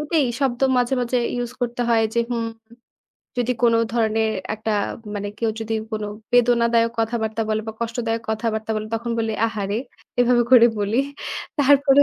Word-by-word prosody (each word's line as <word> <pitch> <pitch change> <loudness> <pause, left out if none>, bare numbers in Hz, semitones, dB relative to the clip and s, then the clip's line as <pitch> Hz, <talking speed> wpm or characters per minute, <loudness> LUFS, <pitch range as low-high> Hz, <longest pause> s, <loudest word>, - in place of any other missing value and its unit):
ওটাই 300 -1 +1
শব্দ 260 -3 0 0.2
মাঝে, 245 +1 +2
মাঝে, 245 +1 0 0.2
ইউস 245 0 -3
করতে 245 0 -1
হয় 225 -1 +4
যে - - +1
হুম, 230 -1 -1 0.9
যদি 245 +1 +1
কোন 235 -1 +5 0.2
ধরনের 220 -1 +1 0.2
একটা 220 0 -2 0.4
মানে 205 0 -3
কেউ 230 -1 +1
যদি 225 0 -2 0.2
কোনো 215 -1 -2 0.3
বেদনাদায়ক 235 -1 +4
কথাবার্তা 225 -1 -1
বলে 215 0 +1
বা - - -3
কষ্টদায়ক 230 -1 -2
কথাবার্তা 220 0 -2
বলে 215 0 -3
তখন 235 +1 -3
বলি 225 -1 0
"আহারে", 210 -1 -2 0.4
এভাবে 245 0 +4
করে 240 -2 +9
বলি। 205 +3 0 0.6
তারপরে 285 0 +6
230 Hz, 155 wpm, -22 LUFS, 220-245 Hz, 0.9 s, করে